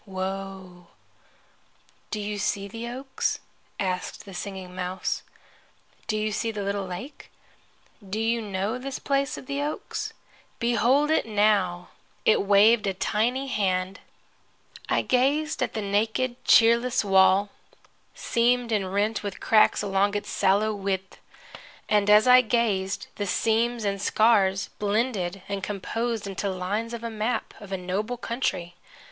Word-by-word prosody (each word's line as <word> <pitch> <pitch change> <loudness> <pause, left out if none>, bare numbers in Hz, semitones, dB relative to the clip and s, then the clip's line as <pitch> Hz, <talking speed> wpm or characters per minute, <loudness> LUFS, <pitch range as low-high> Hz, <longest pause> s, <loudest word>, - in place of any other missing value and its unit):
Woe.' 190 -2 -6 1.2
"Do 215 - -3
you 205 0 -3
see 200 0 -1
the 230 +3 -7
oaks?" 260 +3 -2 0.4
asked 185 0 -3
the 195 - -10
Singing 190 -1 -6
Mouse. 185 0 -3 0.9
"Do 215 - 0
you 215 0 -1
see 225 +2 -1
the 210 -2 -4
little 200 -1 -2
lake? 185 +11 -8 0.8
Do 210 +3 -2
you 230 +1 +1
know 205 +3 -2
this 270 +1 -5
place 275 0 -1
of - - -9
the 280 +2 -3
oaks? 295 +1 -4 0.5
Behold 240 +6 +2
it 315 - +2
now!" 205 -5 +1 0.4
It 220 - +4
waved 205 +2 +5
a 195 - -1
tiny 235 +7 0
hand. 190 -4 -1 0.9
I - - +2
gazed 285 +5 +1
at - - -1
the 215 - -2
naked, 220 +5 -1
cheerless 235 0 +5
wall, 195 +1 +4 0.6
seamed 240 0 +1
and 195 -4 0
rent 210 +3 0
with 200 -2 -5
cracks 215 -1 +4
along 200 +1 +1
its 205 - -3
sallow 205 +3 +2
width. 195 -2 -3 0.7
And 210 -1 +2
as 210 +2 +7
I 250 0 +8
gazed 210 -5 0
the 205 - -2
seams 230 +3 +1
and 200 -1 -1
scars 200 -3 +3
blended 200 -3 -1
and 200 -1 -3
composed 220 +3 -3
into 195 0 -3
the 190 - -3
lines 210 +6 -2
of 230 - -9
a 230 - -4
map 220 +2 -2
of 205 -2 -11
a 190 - -1
noble 200 +7 -3
country. 230 -8 -2
210 Hz, 140 wpm, -26 LUFS, 195-235 Hz, 1.2 s, I